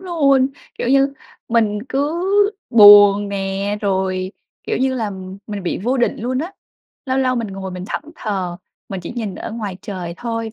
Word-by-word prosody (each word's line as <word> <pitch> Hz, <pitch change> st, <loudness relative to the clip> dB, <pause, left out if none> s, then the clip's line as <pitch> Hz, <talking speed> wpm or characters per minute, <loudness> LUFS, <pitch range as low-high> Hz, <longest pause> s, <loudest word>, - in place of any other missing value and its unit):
luôn. 280 Hz, -8 st, +2 dB, 0.3 s
Kiểu 240 Hz, -, -2 dB
như 275 Hz, +1 st, +3 dB, 0.4 s
mình 220 Hz, -3 st, +2 dB
cứ 290 Hz, +5 st, -1 dB, 0.5 s
buồn 205 Hz, -2 st, +8 dB
nè, 195 Hz, +1 st, -2 dB
rồi, 190 Hz, -1 st, -1 dB, 0.3 s
kiểu -, -, -2 dB
như 260 Hz, 0 st, +1 dB
là, 220 Hz, -4 st, -2 dB, 0.4 s
mình 205 Hz, -3 st, -5 dB
bị 180 Hz, -, -2 dB
vô 245 Hz, +7 st, 0 dB
định 240 Hz, -, +1 dB
luôn 255 Hz, +3 st, -2 dB
á. 340 Hz, +6 st, -4 dB, 0.5 s
Lâu 260 Hz, +1 st, 0 dB
lâu 255 Hz, -1 st, +1 dB
mình 230 Hz, -3 st, -2 dB
ngồi 190 Hz, -1 st, -6 dB
mình 180 Hz, 0 st, -6 dB
thẫn 210 Hz, -, -4 dB
thờ, 190 Hz, -5 st, -3 dB, 0.3 s
mình 195 Hz, -2 st, -5 dB
chỉ 170 Hz, -, -7 dB
nhìn 215 Hz, -6 st, -3 dB
ở -, -, -6 dB
ngoài 210 Hz, -5 st, -5 dB
trời 180 Hz, -4 st, -6 dB
thôi 230 Hz, -1 st, -4 dB
210 Hz, 175 wpm, -19 LUFS, 195-255 Hz, 0.5 s, buồn